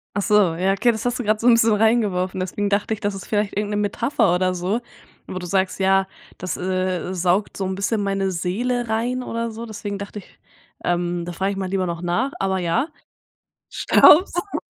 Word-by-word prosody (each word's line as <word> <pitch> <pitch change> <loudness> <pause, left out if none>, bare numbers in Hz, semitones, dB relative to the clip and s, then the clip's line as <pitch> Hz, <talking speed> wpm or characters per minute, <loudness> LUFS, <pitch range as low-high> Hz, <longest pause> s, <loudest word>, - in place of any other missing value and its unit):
Ach 205 - +1
so, 205 -5 +3
ja, 185 +3 +1
okay, 240 +5 +3
das 220 0 -5
hast 245 +1 -1
du 250 - -2
gerade 215 0 +1
so 235 - 0
'n 240 - +8
bisschen 225 -1 +4
reingeworfen, 205 -5 +1
deswegen 200 +2 -2
dachte 205 +2 0
ich, 215 - -5
das 205 -3 -2
ist 195 - -8
vielleicht 210 -1 -1
irgend 205 +1 -2
'ne 205 - -1
Metapher 205 0 +1
oder 185 +1 +1
so, 190 +7 -1 0.5
wo 185 - -6
du 180 - -5
sagst: 190 +2 0
„Ja, 195 0 +3 0.3
das, 185 -1 -4
äh, 185 0 -2
saugt 185 +3 0
so 190 - -2
'n 190 - -2
bisschen 205 +2 -1
meine 195 -1 -1
Seele 235 +8 -1
rein“ 235 +3 -1
oder 230 -1 -3
so. 230 +2 -7
Deswegen 205 -2 -5
dachte 200 +1 -7
ich, 195 - -18 0.4
ähm, 175 0 -1
da 175 - -6
frage 190 +3 -1
ich 195 - -5
mal 190 -1 -3
lieber 190 -1 0
noch 170 -1 -4
nach, 205 +11 0
aber 190 -1 0
ja, 175 - 0 0.8
Staubsaugen. 350 +4 +4
200 Hz, 210 wpm, -22 LUFS, 185-220 Hz, 0.8 s, n